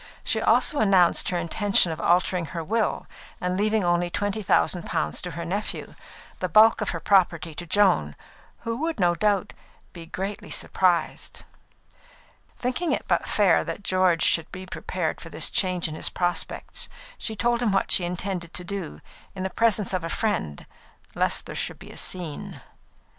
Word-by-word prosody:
She - - 0
also 295 - +3
announced 190 -5 +4
her 180 - -1
intention 175 +1 +2
of 160 - -5
altering 180 0 +2
her 165 - -2
will, 220 +6 -1 0.3
and 180 0 -1
leaving 215 +1 +1
only 175 0 +1
twenty 205 +3 -2
thousand 180 -2 +1
pounds - - -1
to 180 - -5
her 170 0 -6
nephew, 200 +5 -4 0.5
the 185 - -2
bulk 220 +6 +6
of 210 - -1
her 165 - -3
property 175 -3 +2
to 175 +3 -8
Joan, 175 - +2 0.5
"who 230 0 -3
would 320 0 -2
no 175 -2 +3
doubt 205 +1 0 0.4
be 170 -2 -10
greatly 195 +4 -5
surprised." 175 -3 -1 1.1
Thinking 255 +8 -1
it - - -2
but - - +1
fair 195 -6 +3
that 165 +5 -6
George 185 -3 +2
should 165 -1 +2
be 185 0 -7
prepared 180 -2 -4
for 165 - -9
this - - 0
change 185 -3 +1
in 155 - -6
his 155 - -1
prospects, 175 -1 -2 0.3
she 220 - -1
told 240 +2 +1
him 230 -4 +2
what 195 - +1
she 180 - +7
intended 175 -1 -3
to 180 - -2
do, 185 -3 -6 0.3
in 185 - -4
the 190 - -3
presence 215 -3 +1
of 185 -2 -1
a 165 - -3
friend, 180 - -2 0.5
lest - - 0
there - - -7
should - - -3
be - - -12
a - - -12
scene. 175 -5 -4
185 Hz, 175 wpm, -25 LUFS, 170-205 Hz, 1.1 s, she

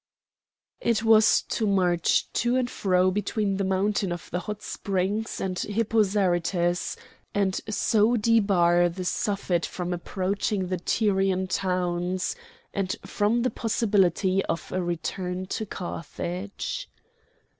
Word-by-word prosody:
It 230 -1 +1
was 220 -1 +5
to 220 - 0
march 180 -4 +2
to 240 +1 +1
and 255 -1 +1
fro 185 -5 +2
between 205 0 -1
the 195 - 0
mountain 195 0 0
of 175 - -6
the 180 - -1
Hot 210 +3 -6
Springs 200 +3 -2
and 185 -2 -2
Hippo 225 +1 +1
Zarytus, 175 -3 +1 0.4
and 195 -2 +1
so 220 +2 +3
debar 195 -6 +4
the 180 +2 -6
Suffet 195 -4 0
from 180 -1 -4
approaching 190 +2 -2
the 185 -2 -1
Tyrian 195 -2 +1
towns, 180 -1 -1 0.4
and 195 -2 -1
from 220 +3 +1
the 255 - +1
possibility 195 -4 +2
of 165 - -4
a 185 - -1
return 180 +2 -3
to 220 - -3
Carthage. 185 - -5
190 Hz, 125 wpm, -26 LUFS, 180-210 Hz, 0.4 s, was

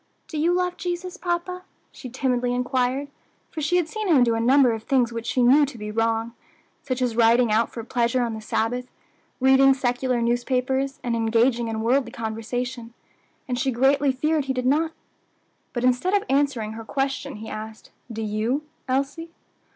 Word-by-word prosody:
Do 310 - -4
you 335 +3 +3
love 360 0 0
Jesus, 355 0 -4
papa?" 355 +1 -3 0.3
she 255 - -9
timidly 250 -1 0
inquired, 255 +2 0 0.4
for 315 - -5
she 350 +5 +2
had 350 -3 +1
seen 430 +5 -4
him 295 -8 +5
do 235 -1 +2
a 225 - 0
number 255 +2 +5
of 225 -1 -3
things 245 -1 +1
which 230 0 -5
she 250 - +1
knew 270 +5 +6
to 265 -3 -9
be 210 -1 -6
wrong 225 +1 0 0.5
such 255 -2 -2
as 240 -3 -1
riding 235 0 +4
out 220 +2 +2
for 230 - -6
pleasure 240 +1 0
on 235 -1 -2
the 220 - -6
Sabbath, 240 +3 -1 0.5
reading 265 +1 +5
secular 250 -1 0
newspapers, 255 +3 0
and 240 -1 -1
engaging 230 +1 +2
in 220 -1 -3
worldly 250 +4 +1
conversation 230 +2 -4 0.5
and 245 -1 -2
she 270 - +1
greatly 270 +3 +3
feared 300 +3 0
he 265 - -1
did 255 -1 -3
not. 310 +5 +2 0.8
But 240 - -3
instead 255 +10 +2
of 405 - +2
answering 270 -6 +1
her 225 +1 -7
question, 270 +3 -2
he 220 +1 -8
asked, 220 +1 -8 0.2
"Do 225 0 -4
you, 220 +7 -1 0.2
Elsie?" 275 +5 -2
250 Hz, 180 wpm, -24 LUFS, 230-275 Hz, 0.8 s, knew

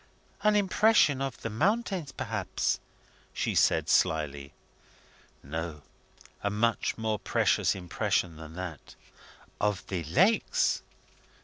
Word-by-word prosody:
"An 210 0 +3
impression 200 -7 +4
of 135 -3 -3
the 115 - -2
mountains, 190 - 0
perhaps?" - - -2 0.5
she - - -1
said - - +3
slyly. 70 -3 +1 0.9
"No; 80 +1 -5 0.6
a 100 - 0
much 110 +3 0
more 110 -2 -1
precious - - +2
impression 90 -2 -1
than 80 0 -10
that." 90 -5 -7 0.6
"Of 105 -3 0
the 90 -3 -3
lakes?" 185 - +2
105 Hz, 105 wpm, -29 LUFS, -, 0.9 s, impression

